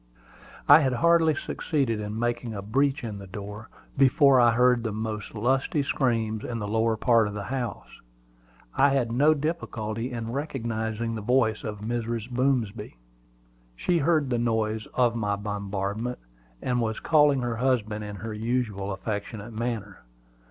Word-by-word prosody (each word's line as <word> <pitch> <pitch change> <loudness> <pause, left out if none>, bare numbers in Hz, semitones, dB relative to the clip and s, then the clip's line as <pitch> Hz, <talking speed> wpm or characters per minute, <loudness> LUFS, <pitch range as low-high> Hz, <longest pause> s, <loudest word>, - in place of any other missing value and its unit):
I 145 +2 +9
had 135 -4 +1
hardly 165 +3 +4
succeeded 135 -6 -1
in 105 +1 -4
making 120 -1 -2
a 100 - -5
breach 135 +6 +1
in 105 -4 -5
the 100 - -10
door, 105 +2 -8 0.3
before 135 0 +5
I 120 -1 +6
heard 125 +1 +4
the 115 - -2
most 110 0 -5
lusty 130 +6 +1
screams 115 -6 0
in 120 - -4
the 105 -2 -4
lower 110 +1 +1
part 115 -2 +3
of 105 - -6
the 100 - -4
house. 125 -4 -5 0.7
I 140 - +4
had 120 -4 0
no 145 +6 +4
difficulty 125 -7 -3
in 115 -1 -4
recognizing 115 -5 -3
the 110 - -4
voice 110 -1 +1
of 105 -1 -5
Mrs. 115 +1 -3
Boomsby. 125 - -1 0.8
She 170 - +1
heard 155 -3 +2
the 120 - +1
noise 110 -2 -1
of 120 -2 +3
my 105 -3 0
bombardment, 100 +3 -3 0.5
and 125 -1 0
was 110 -1 -2
calling 150 -4 +4
her 120 -2 -2
husband 110 -4 0
in 105 -1 -6
her 110 +2 -6
usual 110 -3 -2
affectionate 105 +2 -5
manner. 110 -3 -4
115 Hz, 155 wpm, -26 LUFS, 105-130 Hz, 0.8 s, I